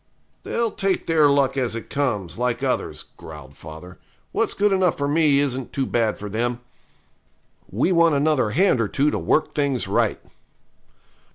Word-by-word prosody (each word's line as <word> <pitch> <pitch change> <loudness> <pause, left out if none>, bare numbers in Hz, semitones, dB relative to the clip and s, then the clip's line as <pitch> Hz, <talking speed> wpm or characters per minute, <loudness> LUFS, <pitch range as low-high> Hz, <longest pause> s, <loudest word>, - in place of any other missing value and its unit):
'They'll 230 -2 -1
take 195 -1 -1
their 160 -3 +4
luck 140 -1 +2
as 125 -4 -1
it 115 - -6
comes, 120 - -2
like 125 -1 -1
others,' - - -2
growled 65 +2 -11
father; 80 +5 -11 0.3
'what's - - -1
good 205 0 +2
enough 185 -3 +2
for 140 - -1
me 150 -1 +3
isn't 135 -3 -1
too 135 - -1
bad 115 -4 0
for 105 - -7
them. 120 +4 -2 1.1
We 115 - 0
want 170 -3 +4
another 140 -5 +2
hand 145 - +2
or 110 - 0
two 145 +7 +1
to - - -2
work 155 - 0
things 140 -4 -1
right.' - - 0
140 Hz, 165 wpm, -22 LUFS, 115-155 Hz, 1.1 s, their